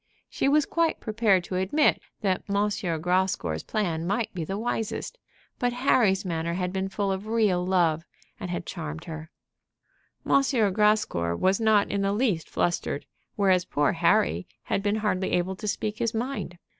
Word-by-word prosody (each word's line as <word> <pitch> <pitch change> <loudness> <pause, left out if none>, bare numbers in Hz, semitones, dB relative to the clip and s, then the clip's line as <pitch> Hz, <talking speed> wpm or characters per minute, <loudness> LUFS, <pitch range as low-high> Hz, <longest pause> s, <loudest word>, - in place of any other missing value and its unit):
She 275 - +1
was 295 0 +4
quite 335 -1 0
prepared 215 -4 +2
to 185 - -4
admit 200 +12 +2 0.2
that 190 -3 +1
M. 200 - 0 0.5
Grascour's 180 - 0
plan 170 -6 -2
might 210 +4 -1
be 175 -3 -3
the 195 +5 -3
wisest; 225 - -3 0.4
but 245 -1 +1
Harry's 240 -7 +2
manner 170 -1 -2
had 180 0 -2
been 190 0 -2
full 200 0 -1
of 190 +2 -4
real 215 -6 +2
love, 170 -4 +2 0.4
and 180 - -5
had 175 -1 -3
charmed 160 -2 -6
her. 160 -2 -7 1.0
M. 275 - +4 0.3
Grascour 210 - +2
was 190 - +2
not 220 -2 +3
in 200 - 0
the 195 0 +1
least 205 -8 0
flustered, 170 -4 -1 0.3
whereas 190 -3 +3
poor 145 -5 +1
Harry 85 +4 +2 0.2
had - - -1
been 205 +1 +1
hardly 205 -3 -1
able 180 +2 0
to 210 - -6
speak 210 +1 -2
his 230 -1 -1
mind. 235 -6 -3
190 Hz, 165 wpm, -26 LUFS, 175-215 Hz, 1.0 s, was